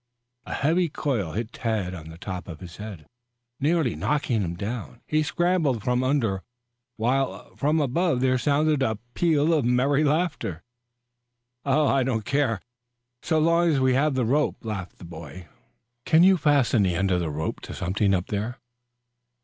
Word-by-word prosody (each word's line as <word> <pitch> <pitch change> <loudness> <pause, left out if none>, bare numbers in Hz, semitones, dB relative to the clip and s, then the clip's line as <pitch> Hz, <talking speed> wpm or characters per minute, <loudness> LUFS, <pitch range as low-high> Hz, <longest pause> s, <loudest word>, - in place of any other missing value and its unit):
A - - -4
heavy 165 +4 +2
coil 120 - -2
hit 115 +2 -4
Tad 110 -6 -2
on 80 -3 -8
the 80 - -10
top 90 -1 -6
of 80 -3 -8
his 90 -2 -10
head, 105 -7 -8 0.5
nearly 150 -3 +1
knocking 140 -6 0
him 85 -2 -3
down. 115 +5 -5
He 155 0 +1
scrambled 155 - +1
from 125 +2 +1
under 120 -8 +1 0.6
while 130 +4 -1
from 150 +3 +1
above 150 +1 +1
there 130 0 +2
sounded 150 +2 +2
a 110 -5 +1 0.2
peal 160 -2 +2
of 155 -4 +2
merry 130 +5 +2
laughter. 150 - -1 1.0
"I 140 -1 +3
don't 120 -5 -1
care, 140 -7 0 0.6
so 160 - 0
long 170 +2 +3
as 145 -4 +2
we 130 -1 +3
have 140 +2 +2
the 125 -2 +1
rope," 140 0 0
laughed 100 -5 -5
the - - -11
boy. 85 0 -10 0.6
"Can 160 +6 +5
you 190 +1 +7
fasten 140 - +3
the 90 -3 +1
end 95 +2 +1
of 90 - +2
the 85 -2 -2
rope 75 +1 -3
to - - -8
something 95 +2 0
up 90 0 -1
there?" 110 +5 -3
125 Hz, 165 wpm, -25 LUFS, 100-150 Hz, 1.0 s, you